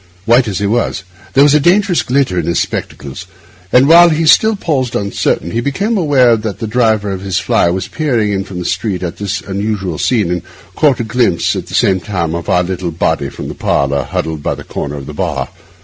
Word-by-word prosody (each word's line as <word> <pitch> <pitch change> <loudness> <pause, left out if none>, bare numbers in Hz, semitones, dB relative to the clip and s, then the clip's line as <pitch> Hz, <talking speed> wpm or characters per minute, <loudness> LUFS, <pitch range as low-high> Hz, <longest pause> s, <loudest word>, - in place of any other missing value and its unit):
White 120 +2 +4
as 100 -3 -2
he 100 - -1
was, 105 -2 -1 0.3
there 135 - +5
was 145 -1 +5
a 150 - +5
dangerous 180 +3 +3
glitter 125 -9 0
in 85 - -3
his 85 - +1
spectacles; 70 -1 -5 0.4
but 125 +5 +5
while 170 +3 +7
he 160 0 0
still 220 +7 +5
paused 135 - -2
uncertain, 100 -4 -1
he 115 - -1
became 200 - -1
aware 140 - +4
that 110 -2 -4
the - - -4
driver 110 -2 +1
of 95 -1 -4
his 95 -1 -2
fly 85 - +2
was 90 +1 -2
peering 120 -9 0
in 95 -1 -1
from 95 -2 -9
the 90 - -4
street 95 -3 -2
at 85 - -4
this 100 -2 -3
unusual 95 -3 -3
scene 105 -9 +1
and 90 -1 -1 0.3
caught 145 -4 +2
a - - -1
glimpse 115 -5 +1
at - - -5
the - - -6
same 95 -1 +3
time 90 -5 -3
of 85 -1 -5
our 90 0 +3
little 90 -1 -3
body 80 -3 -1
from - - -8
the - - -5
parlour, 70 0 0
huddled 80 +3 -4
by - - -2
the - - -10
corner 70 0 -5
of 70 -2 -7
the 75 - -8
bar. - - -3
105 Hz, 225 wpm, -14 LUFS, 90-130 Hz, 0.4 s, while